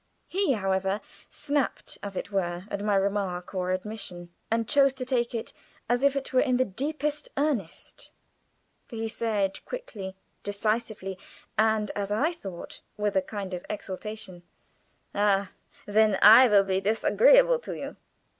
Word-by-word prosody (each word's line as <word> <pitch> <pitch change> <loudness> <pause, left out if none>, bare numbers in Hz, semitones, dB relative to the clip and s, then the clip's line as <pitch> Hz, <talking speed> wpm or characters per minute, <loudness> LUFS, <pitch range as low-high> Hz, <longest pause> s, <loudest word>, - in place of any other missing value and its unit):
He, 380 -6 +1
however, 195 -1 0 0.3
snapped, 285 -2 -2
as 200 -1 -6
it 200 - -4
were, 180 -2 -1
at 200 0 -3
my 210 -1 +2
remark 195 -2 -1
or 185 -1 -1
admission, 185 -3 -4 0.2
and 225 0 0
chose 275 -2 +4
to 255 -1 -4
take 245 -2 0
it 225 - -4 0.3
as 245 +1 +1
if 280 0 +3
it 275 -1 -3
were 255 - +5
in 255 -3 +2
the 255 - +3
deepest 295 +7 -3
earnest; 275 - -3 0.8
for 235 - -9
he 225 0 -2
said, 210 -4 -1
quickly, 210 - -7 0.3
decisively, 205 -2 -2 0.4
and, 220 -1 +2
as 200 -1 -3
I 275 +11 +2
thought, 195 - -8 0.2
with 210 -1 -1
a 190 - +4
kind 195 -1 -6
of 180 - -4
exultation: 205 -2 -6 0.7
"Ah, 200 -1 +2 0.3
then 210 -1 +3
I 225 +5 +10
will 205 -3 +5
be 190 0 0
disagreeable - - +5
to - - -6
you." - - -6
210 Hz, 150 wpm, -27 LUFS, 195-255 Hz, 0.8 s, I